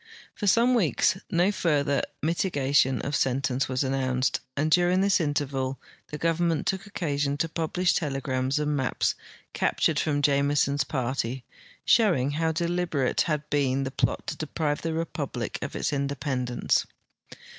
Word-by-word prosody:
For 205 - -4
some 235 +6 +4
weeks 175 - +2
no 175 +3 +2
further 145 -7 +1 0.2
miti 170 +4 +1
gation 135 - +2
of 145 +1 -1
sentence 135 0 0
was 130 +1 0
announced, 130 -1 0 0.2
and 155 +2 +1
during 180 +2 +4
this 200 -1 +3
interval 135 -3 -1 0.3
the 150 - -6
government 165 +1 0
took 195 +1 -2
occasion 145 -8 -1
to 165 - 0
imhlish 175 +3 0
telegrams 135 -3 -1
and 150 0 0
mai)S 130 -3 0 0.4
cap - - -1
tured - - +2
from 145 -2 0
Jameson's 140 0 +2
party, 130 -2 -2 0.4
showing 170 - +3
hoAV 160 +2 0
delil)erate 170 -7 0
had 150 -2 -1
been 135 -2 +1
the 130 0 -4
])lot - - +1
to - - -4
de})rive 150 -1 -2
the 165 - -2 0.2
repul)lic - - -4
of - - -5
its - - -1
inde))endence. 140 -3 -1
145 Hz, 145 wpm, -26 LUFS, 135-165 Hz, 0.4 s, some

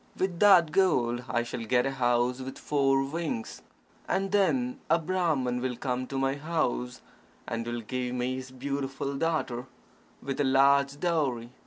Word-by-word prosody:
With 185 -2 -1
that 185 -6 +6
gold 125 -11 +2
I 120 +1 +1
shall 120 0 -5
get 125 +2 +2
a 135 - 0
house 125 -1 +1
with 130 0 -7
four 135 -2 +2
wings. 150 -5 -4 0.5
And 195 0 0
then 245 +6 +1
a 165 - +5
Brahman 155 -8 0
will 130 -1 -2
come 125 +1 -3
to 135 - -4
my 135 0 +1
house, 145 - -2 0.5
and 115 0 -3
will 120 0 -3
give 125 +2 -3
me 125 +1 -1
his 130 0 -7
beautiful 135 +1 -4
daughter, 135 -5 -1 0.5
with 135 +1 -3
a - - +3
large 140 +1 +3
dowry. 140 -9 0
135 Hz, 160 wpm, -28 LUFS, 125-160 Hz, 0.5 s, that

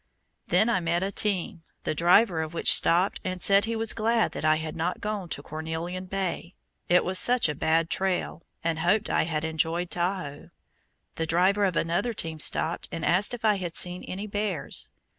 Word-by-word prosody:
Then 220 - +3
I 235 -5 +2
met 170 +1 -1
a 195 - -2
team, 195 -5 -1 0.2
the - - -1
driver 175 +2 +4
of 160 +1 -6
which - - +5
stopped 180 +4 +2
and 185 0 -4
said 200 +3 +4
he 230 0 -2
was 225 0 +1
glad 225 0 +1
that - - -6
I 155 0 +4
had 155 0 -5
not 170 +2 -2
gone 205 -4 -4
to 145 - -4
Cornelian 160 +4 -5
Bay, 185 -2 -4 0.3
it 180 +1 +4
was 185 +1 +2
such 245 -4 +5
a 150 - -2
bad 160 +3 +1
trail, 190 -3 -1 0.2
and 165 -1 -1
hoped 200 +6 +1
I - - +2
had 155 -1 -2
enjoyed 160 +2 -1
Tahoe. 175 -5 -3 0.7
The 160 - -2
driver 190 +5 +2
of 185 -3 -1
another 175 +10 0
team 160 -6 -4
stopped 160 +2 +1
and 165 - -4
asked 195 +7 +2
if 235 -1 -7
I 210 -2 +3
had 175 -3 -5
seen 180 0 0
any 195 +3 -5
bears. 205 -6 -3
180 Hz, 195 wpm, -26 LUFS, 165-200 Hz, 0.7 s, which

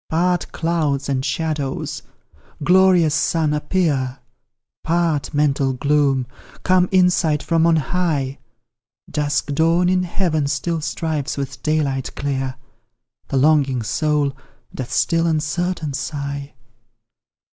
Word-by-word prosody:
Part, 175 +2 0
clouds 160 -4 -1
and 130 -2 0
shadows! 150 -3 -2 0.6
Glorious 180 -2 +5
Sun 160 -3 +1
appear! 150 -4 0 0.7
Part, 165 -3 0
mental 140 -2 +1
gloom! 140 -1 +1 0.4
Come 185 -1 +3
insight 180 -5 +3
from 165 0 +2
on 165 - +4
high! 150 -4 -1 0.7
Dusk 145 -1 -1
dawn 165 +4 +3
in 185 0 +2
heaven 170 -5 -1
still 160 +3 -1
strives 155 -3 -3
with 140 -2 -5
daylight 145 -4 -1
clear 135 -2 -2 0.7
The 135 - -1
longing 140 -3 +3
soul 145 +3 0 0.4
doth 130 -2 -6
still 165 0 +2
uncertain 160 0 -1
sigh. 140 0 -5
150 Hz, 105 wpm, -20 LUFS, 140-170 Hz, 0.7 s, Glorious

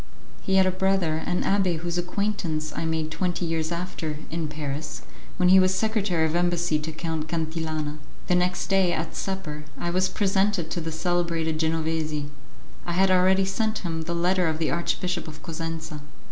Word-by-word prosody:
He 190 - +1
had 190 0 +6
a 185 - +3
brother, 185 -4 +1
an 180 0 +1
abbé 190 -4 +2
whose 170 +1 -3
acquaintance 175 -4 -1
I - - -2
made 160 -1 -1
twenty 175 +1 -1
years 165 0 -1
after, 170 -3 -3
in 165 -1 -1
Paris, 150 0 -4 0.3
when 180 -1 +4
he 190 +1 +9
was 185 0 +4
secretary 200 -5 +1
of 160 +1 -1
embassy 175 -2 +2
to 155 +1 -4
Count 160 -1 -3
Cantillana. 160 -2 -2 0.3
The - - +1
next 180 0 +2
day, 190 -2 +3
at 160 +1 -3
supper, 155 -6 -4
I 175 - -1
was 185 +1 +2
presented 195 -3 +1
to 170 - -1
the 160 0 -3
celebrated 165 -1 0
Genovesi; 160 -2 0 0.5
I 175 - -3
had 190 +2 +4
already 190 +1 +5
sent 215 +1 -1
him 165 -1 -2
the 170 +1 -3
letter 180 +1 +2
of 160 -1 0
the 160 -1 0
Archbishop 175 +1 -1
of 155 0 -10
Cosenza. 165 -1 -5
170 Hz, 175 wpm, -26 LUFS, 160-185 Hz, 0.5 s, he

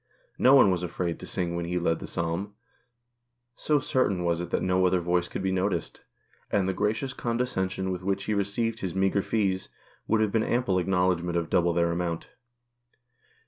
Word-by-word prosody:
No 130 +2 +7
one 115 -8 +7
was 90 -1 0
afraid 85 -1 -3
to - - -8
sing 85 -1 -2
when 85 0 -2
he 90 +1 -2
led 80 -2 0
the - - -7
Psalm, 85 +5 -3 1.0
so 150 - +1
certain 130 -10 0
was 85 0 0
it 90 - -5
that - - -1
no 90 0 +3
other 90 0 +2
voice 85 0 0
could 95 - -5
be 95 - +1
noticed, 95 -2 -1 0.5
and 95 -2 +1
the 95 - 0
gracious 105 +7 -1
condescension 95 -7 -2
with 90 -1 -4
which 95 +1 -1
he 105 - -1
received 105 +3 -1
his 95 -2 -4
meagre 95 +1 +2
fees 95 -3 -1 0.4
would 110 - +2
have 110 -2 +1
been 115 - +2
ample 110 -6 +1
acknowledgment 90 -2 +1
of 85 -1 -2
double 85 -1 +3
their 85 0 +1
amount. 85 -1 -3
95 Hz, 185 wpm, -27 LUFS, 85-105 Hz, 1.0 s, No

